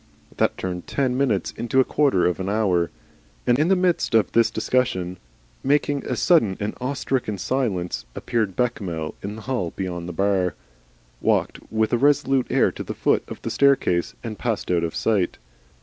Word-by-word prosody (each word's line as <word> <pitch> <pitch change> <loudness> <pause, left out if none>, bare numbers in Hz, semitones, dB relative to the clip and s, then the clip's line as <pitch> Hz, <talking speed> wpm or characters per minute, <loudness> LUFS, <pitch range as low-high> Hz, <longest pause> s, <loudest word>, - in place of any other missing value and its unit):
That - - +1
turned 90 -1 -4
ten 130 -3 0
minutes 125 -9 +1
into 125 +3 0
a - - +7
quarter 135 -10 +2
of 90 +1 +1
an 95 +1 -2
hour. 95 -5 +1 0.6
And 120 +2 +3
in 155 - +3
the 190 - +4
midst 180 -9 +1
of 110 -4 +3
this 115 -1 +4
discussion, 95 -7 0 0.5
making 145 0 +1
a - - -1
sudden 115 - +3
and 105 +1 -2
awestricken 130 -4 -1
silence, 95 -6 -1
appeared 110 -6 -1
Bechamel 90 -10 -2
in 100 +2 -5
the 110 - -10
hall 120 -11 -2
beyond 90 -2 -4
the - - -5
bar, 95 0 +1 0.7
walked - - +1
with 110 +1 +1
a 120 - +3
resolute 135 -1 +3
air - - +3
to - - -8
the - - -6
foot - - +2
of - - -9
the - - -3
staircase, 135 -11 +2
and 110 -3 -6
passed 115 -6 -2
out 85 -1 +2
of 85 - -3
sight. 105 -6 +1
110 Hz, 180 wpm, -23 LUFS, 90-130 Hz, 0.7 s, a